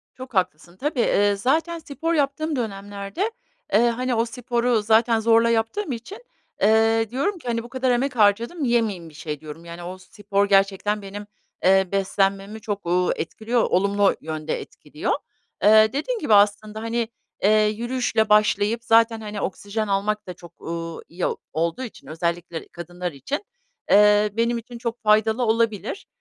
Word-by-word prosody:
Çok 255 -1 -10
haklısın, 180 -2 -2
tabii, 285 +2 -2
eee, 205 -3 +3
zaten 320 +10 0
spor 320 +2 -3
yaptığım 305 +1 0
dönemlerde, 205 - -4 0.4
eee, 235 +3 +5
hani, 250 +1 -1
o 230 +1 +2
sporu 240 -1 0
zaten 225 +1 +3
zorla 230 +1 +4
yaptığım 230 - 0
için, 325 - -8 0.4
eee, 225 +1 +3
diyorum 350 - -1
ki, 255 - -12
hani, 230 -1 -1
"Bu 240 - -11
kadar 260 -1 0
emek 255 +2 0
harcadım, 230 - +2
yemeyeyim 220 -9 0
bir - - -18
şey." 150 -1 -6
diyorum. 155 +2 -10
Yani, 170 +1 -8
o 185 +2 -7
spor 200 +1 -2
gerçekten 195 +1 +2
benim, 205 +1 -8 0.4
eee, 190 0 +4
beslenmemi 195 +2 0
çok, 205 -3 -4
ııı, 180 +1 +2
etkiliyor 225 +7 -1
olumlu 200 +2 +2
yönde 155 -1 -4
etkiliyor. - - -4 0.5
Eee, 215 +2 +6
dediğim 450 - -2
gibi 270 -8 +1
aslında, 210 +1 +3
hani, 230 0 -1 0.4
eee, 215 +1 +5
yürüyüşle 235 +1 0
başlayıp 210 +2 +3
zaten, 225 -1 +4
hani, 210 -1 -5
oksijen 205 +3 -3
almak 205 +1 -1
da 180 - -5
çok, 170 -1 -16
uuu, 165 0 -5
iyi 175 +1 -3 0.3
olduğu 165 +9 -1
için 235 - -10
özellikle 170 +1 -3
kadınlar 175 +1 -6
için, 280 - -5 0.5
eee, 210 +1 +6
benim 235 +1 +1
için 235 +1 -9
çok 235 0 -4
faydalı 220 +3 +3
olabilir 225 - 0
215 Hz, 155 wpm, -23 LUFS, 195-235 Hz, 0.5 s, Eee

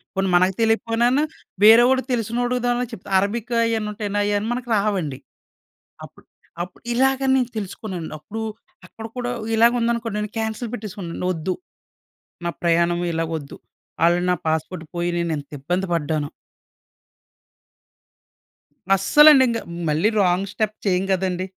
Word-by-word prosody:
పోనీ 195 0 0
మనకు 185 +2 +4
తెలియకపోయినాన్న 230 +3 +2 0.4
వేరే 225 +3 +9
వాడు 260 0 +3
తెలిసినోడు, 245 +2 0
దాంట్లో 245 0 +1
చెప్తా 195 - -10
అరబికు 230 +4 -2
ఆయన్నీ 225 -2 0
ఉంటాయండి. 205 -1 -4
ఆయన్నీ 205 +1 0
మనకి 245 0 -5
రావండి. 190 -10 -1 0.9
అప్పుడు - - -18 0.4
అప్పుడు 180 0 -12
ఇలాగని 265 +1 +2
నేను 250 -2 0
తెలుసుకున్నానండి. 190 -4 -5
అప్పుడు 220 +9 -7 0.4
అక్కడ 225 - -10
కూడా 245 0 -2 0.2
ఇలాగ 230 +2 +5
ఉందనుకోండి. 230 -2 -1
నేను 210 0 -4
కాన్సెల్ 220 +1 -3
పెట్టేసుకున్నాను. 195 -6 -6
వద్దు, 165 +3 -2 0.9
నా - - +1
ప్రయాణం 170 0 +2
ఇలా 165 0 -1
వద్దు. 140 -3 -9 0.5
ఆల్రెడీ 175 +1 +3
నా - - 0
పాస్‌పోర్ట్ 160 +2 -2
పోయి 175 0 0
నేను 170 -1 -1
ఎంత 140 -1 -11
ఇబ్బంది 180 +6 -1
పడ్డానో. 150 -2 -1 2.7
అస్సలండి 295 +5 +7
ఇంక. 230 -1 0 0.3
మళ్ళీ 160 +8 +2
రాంగ్ 185 +1 +1
స్టెప్ 215 +1 -1
చేయం 185 -1 +2
కదండీ! 185 -1 0
205 Hz, 130 wpm, -22 LUFS, 175-235 Hz, 2.7 s, వేరే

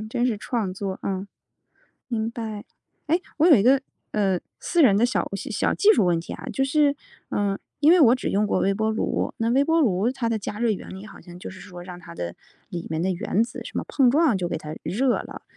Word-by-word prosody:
嗯， 215 - -8
真 240 +2 0
是 225 -4 0
创 210 -3 -2
作， 190 0 -4
嗯。 195 0 -3 0.8
明 225 -1 -1
白。 220 -3 -6 0.4
诶， 335 +4 +2 0.2
我 315 +2 +4
有 330 - +8
一 200 - +4
个， 265 +3 +5 0.3
呃， 195 -4 +1 0.2
私 345 - +2
人 205 -8 +6
的 225 - +3
小 245 - 0
小 - - -7
小 - - +1
技 430 +1 +5
术 195 - +3
问 170 -1 +2
题 165 - -7
啊。 - - -8
就 270 - +1
是， 285 0 +2 0.3
嗯， 200 -1 -1 0.2
因 305 +3 +6
为 360 - +6
我 245 -4 +7
只 255 - -3
用 210 +2 +1
过 - - +1
微 195 - +2
波 220 +2 0
炉， 220 - -1
那 230 0 0
微 270 +3 +4
波 325 +1 +3
炉 210 -2 +2
它 255 -3 -3
的 225 - 0
加 210 +1 -6
热 235 -1 +2
原 205 - -4
理， 190 +2 -8
好 - - -13
像 175 0 -12
就 - - -7
是 190 - -11
说 180 -1 -10
让 180 -1 -9
它 170 -1 -11
的 85 - -5 0.4
里 175 -2 -5
面 160 +1 -2
的 190 - +1
原 190 +4 0
子 235 - -8
什 - - -9
么 - - -1
碰 265 -4 +3
撞 290 -5 +3
就 175 -2 -2
给 - - -2
它 155 0 -7
热 245 +6 +1
了。 - - -8
215 Hz, 265 characters per minute, -24 LUFS, 190-255 Hz, 0.8 s, 有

